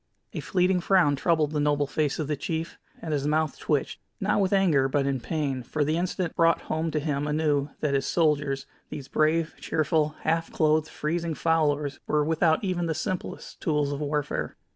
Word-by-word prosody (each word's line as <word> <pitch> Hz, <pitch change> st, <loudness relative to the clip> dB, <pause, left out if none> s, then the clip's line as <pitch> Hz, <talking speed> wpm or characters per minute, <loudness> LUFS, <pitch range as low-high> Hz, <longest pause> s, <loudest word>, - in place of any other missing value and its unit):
A 165 Hz, -, -3 dB
fleeting 180 Hz, +4 st, +1 dB
frown 175 Hz, -6 st, +4 dB
troubled 155 Hz, 0 st, +1 dB
the 150 Hz, -, -1 dB
noble 145 Hz, 0 st, +2 dB
face 145 Hz, 0 st, -1 dB
of 155 Hz, -, -2 dB
the 150 Hz, -, 0 dB
chief, 160 Hz, +3 st, -4 dB, 0.2 s
and 160 Hz, -2 st, -2 dB
his 145 Hz, -1 st, 0 dB
mouth 155 Hz, 0 st, 0 dB
twitched, 145 Hz, -3 st, -1 dB, 0.2 s
not 205 Hz, +1 st, +1 dB
with 190 Hz, -, +1 dB
anger 165 Hz, -9 st, +3 dB
but 140 Hz, 0 st, +1 dB
in 135 Hz, -1 st, 0 dB
pain, 135 Hz, 0 st, -2 dB
for 145 Hz, +5 st, -1 dB
the 155 Hz, +2 st, 0 dB
incident 175 Hz, 0 st, -2 dB
brought 165 Hz, 0 st, +3 dB
home 160 Hz, +1 st, -2 dB
to 155 Hz, -, -1 dB
him 145 Hz, -1 st, -1 dB
anew 150 Hz, -2 st, +1 dB
that 145 Hz, -2 st, 0 dB
his 135 Hz, -1 st, +1 dB
soldiers, 145 Hz, -4 st, +1 dB, 0.2 s
these 135 Hz, -2 st, -7 dB
brave, 155 Hz, +3 st, +1 dB
cheerful, 155 Hz, -1 st, 0 dB
half 165 Hz, +1 st, 0 dB
clothed, 155 Hz, 0 st, +2 dB
freezing 165 Hz, +1 st, -2 dB
followers 150 Hz, -3 st, +1 dB
were 150 Hz, -1 st, +2 dB
without 160 Hz, +2 st, +2 dB
even 180 Hz, -3 st, -1 dB
the 160 Hz, -, -1 dB
simplest 185 Hz, +3 st, -5 dB
tools 150 Hz, -2 st, +1 dB
of 140 Hz, -, -3 dB
warfare. 145 Hz, -1 st, -2 dB
155 Hz, 185 wpm, -26 LUFS, 145-165 Hz, 0.2 s, frown